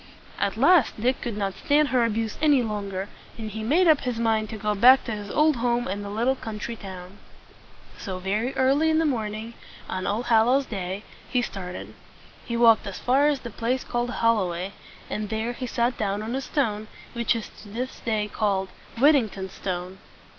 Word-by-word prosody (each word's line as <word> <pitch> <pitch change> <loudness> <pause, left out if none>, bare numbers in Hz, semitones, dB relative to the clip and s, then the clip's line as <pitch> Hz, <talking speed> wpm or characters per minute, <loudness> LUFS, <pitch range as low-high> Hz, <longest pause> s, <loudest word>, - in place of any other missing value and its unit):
At 200 +1 0
last 285 -2 +4
Dick 250 +4 +1
could 230 -4 -4
not 195 -2 -1
stand 290 +9 +2
her 250 -1 +3
abuse 225 -1 -1
any 290 -5 +4
longer, 200 -3 -3 0.3
and 220 -2 -5
he 220 +1 -5
made 315 +11 +3
up 310 -3 +5
his 250 -3 -2
mind 220 -2 +1
to 220 - -6
go 210 0 0
back 250 +6 +7
to 235 - -5
his 205 -2 -5
old 305 +1 +3
home 240 0 0
in 200 +2 -3
the 200 - -6
little 230 +6 +1
country 225 -1 -5
town. 190 -1 -10 0.8
So, 190 -4 -5
very 205 +7 -1
early 275 +5 +3
in 315 - +3
the 325 - +2
morning 220 -4 -2 0.3
on 185 0 -3
All 215 +4 0
hal 225 -1 +4
lows 270 +2 +3
Day, 195 -2 -4 0.3
he 250 -2 +1
started. 185 -5 -6 0.5
He 235 - -3
walked 230 -3 +5
as 195 - -5
far 270 +4 +3
as 290 -3 +1
the 235 - -7
place 240 +4 -1
called 240 0 -2
Hol 230 -2 +2
lo 190 -4 0
way, 180 +3 -4 0.3
and 210 -1 -4
there 220 +2 -2
he 255 +1 -5
sat 240 +1 0
down 205 0 -1
on 225 +2 -4
a 265 - -1
stone, 220 -7 -1 0.3
which 235 -1 +1
to 220 -2 -8
this 250 +5 -5
day 215 -3 -1
is 210 - -11
called 195 -3 0 0.3
"Whit 280 +6 +7
ting 250 -7 +2
ton's 190 -1 -7
Stone." 185 0 -5
225 Hz, 205 wpm, -25 LUFS, 205-250 Hz, 0.8 s, back